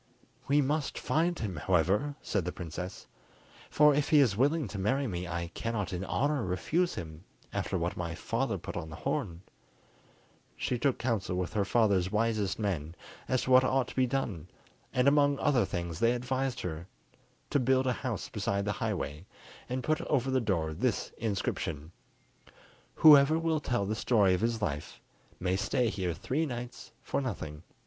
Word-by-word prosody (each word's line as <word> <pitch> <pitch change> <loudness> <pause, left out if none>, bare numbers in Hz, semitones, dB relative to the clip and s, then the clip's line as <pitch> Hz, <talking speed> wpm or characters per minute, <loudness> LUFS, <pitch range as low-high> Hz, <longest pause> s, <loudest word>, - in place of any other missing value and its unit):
"We 145 +1 +4
must 145 +2 -1
find 170 +2 +1
him, 95 -7 -4
however," 95 - +1
said 100 -5 0
the 90 - -3
princess; 90 +2 -7 0.6
"for 150 0 +5
if 145 0 0
he 150 - +6
is 120 -8 +4
willing 145 +4 +2
to 100 - -5
marry 135 +9 +1
me 90 -6 -3
I 85 -1 -3
cannot 110 -5 -3
in 90 +1 -3
honour 145 +6 0
refuse 155 - 0
him, 80 -4 -7 0.3
after 95 - -1
what 85 0 -2
my 85 -1 -4
father - - -1
put - - -7
on 80 -2 -4
the 75 - -8
horn." 85 +3 -3 1.1
She 125 - -1
took 135 0 +1
council 110 -6 -1
with 90 -1 -2
her 100 -2 +1
father's 100 -5 +2
wisest 110 -2 0
men 85 -7 -2 0.3
as 130 - +1
to 130 - -2
what 130 0 +8
ought 130 -1 +1
to - - -10
be 130 -1 +3
done, 115 - -2 0.4
and 125 +1 +2
among 145 0 +4
other 135 -5 +2
things 85 -3 -4
they 115 +1 +4
advised 130 +1 -2
her 85 0 -5 0.6
to 145 - +3
build 130 +1 +2
a 125 - +2
house 125 -5 -4
beside 100 -2 -2
the 105 - 0
highway, 95 -7 -3 0.4
and 125 +1 -2
put 155 +3 +1
over 135 -2 +1
the 130 -1 +2
door 85 -8 0
this 105 +7 -1
inscription:—"Whoever 115 - +1
will 165 -1 +1
tell 120 -7 -1
the 105 - -1
story 105 -4 +3
of 90 - 0
his 115 -1 0
life, 75 -6 -3 0.4
may 90 0 0
stay 110 +4 +1
here 90 -5 -2
three 150 - -1
nights 120 -1 -7
for - - -1
nothing." 80 - -5
110 Hz, 170 wpm, -30 LUFS, 90-130 Hz, 1.1 s, what